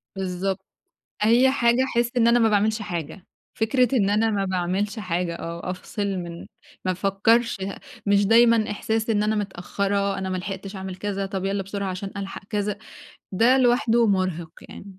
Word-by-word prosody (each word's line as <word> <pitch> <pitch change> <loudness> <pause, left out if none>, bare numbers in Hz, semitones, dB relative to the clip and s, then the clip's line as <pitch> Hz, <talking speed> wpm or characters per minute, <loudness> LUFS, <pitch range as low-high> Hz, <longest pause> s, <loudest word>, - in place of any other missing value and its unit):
بالضبط، 190 +1 -3 0.6
أي 240 +4 +5
حاجة 245 -1 +3
احس 235 -2 0
إن 230 -1 +4
أنا 240 +1 +5
ما 225 -1 +4
باعملش 215 +1 +1
حاجة. 170 0 -6 0.3
فكرة 250 +2 +3
إن 200 -4 +2
أنا 220 +2 +2
ما 200 -2 0
باعملش 190 +3 -1
حاجة، 180 -3 -2
آه، 170 +2 -5
أفصل 185 +3 -5
من 175 -3 -5 0.4
ما 185 - +1
افكّرش 200 +4 +2
ه 195 0 -4 0.3
مش 200 0 +4
دايمًا 230 -1 +5
إحساس 220 +2 -1
إن 210 -1 +2
أنا 215 +1 +1
متأخرة، 200 0 -1
أنا 190 -1 -3
ملحقتش 190 +1 -5
أعمل 190 -1 -6
كذا، 200 0 -3
طب، 190 -1 -4
يالّا 195 0 -1
بسرعة 195 0 -4
عشان 195 +1 -5
ألحق 195 -1 -6
كذا. 210 -1 -1 0.5
ده 235 +7 +4
لوحده 240 -2 +3
مرهق 185 -5 0 0.2
يعني. - - -10
200 Hz, 165 wpm, -24 LUFS, 190-225 Hz, 0.6 s, أي